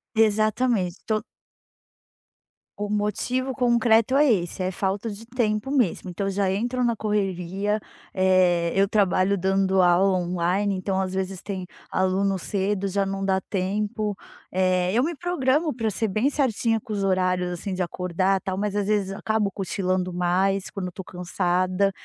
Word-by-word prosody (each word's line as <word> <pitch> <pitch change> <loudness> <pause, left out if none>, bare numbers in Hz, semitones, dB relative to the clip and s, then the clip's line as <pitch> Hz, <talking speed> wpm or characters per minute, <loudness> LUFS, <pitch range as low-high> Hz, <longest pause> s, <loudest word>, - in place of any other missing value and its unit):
Exatamente, 215 -3 +2
to 215 -1 0 1.6
O 205 0 -2
motivo 250 +5 -1
concreto 235 -1 +3
é 290 -3 +5
esse: 175 -2 -1
é 185 - 0
falta 195 +4 -2
de 210 +2 -8
tempo 230 0 -1
mesmo. 220 - 0
Então, 195 +3 -3
eu 195 - 0
já 195 -1 +1
entro 245 +5 -1
na 235 -1 +2
correria, 200 -1 -1 0.3
eh, 185 -2 +3
eu 195 +1 +4
trabalho 195 -1 +2
dando 190 0 +2
aula 185 +2 +4
online, 180 +3 0
então 190 +1 -1
às 185 - -2
vezes 190 -1 -3
tem 190 -3 -5 0.3
aluno 190 +1 +1
cedo, 200 +1 -1
já 200 +1 0
não 195 0 -3
dá 190 -1 +1
tempo. 205 +2 -2 0.4
Eh, 185 -1 +2
eu 240 - +3
me 330 +2 -1
programo 305 -2 0
pra 225 -3 -1
ser 220 +2 -1
bem 215 +8 +1
certinha 230 -5 +1
com 215 - -7
os 200 -1 -1
horários, 185 -1 +1
assim, 185 +2 -4
de 185 - -2
acordar, 180 +2 0
tal, 190 +1 -3
mas 205 -1 -2
às 205 -1 0
vezes 205 -2 0
acabo 210 +1 0
cochilando 185 -1 -2
mais 185 +2 +1
quando 195 -2 -5
eu - - -6
tô 190 - -8
cansada. 185 +2 0
195 Hz, 160 wpm, -24 LUFS, 185-215 Hz, 1.6 s, é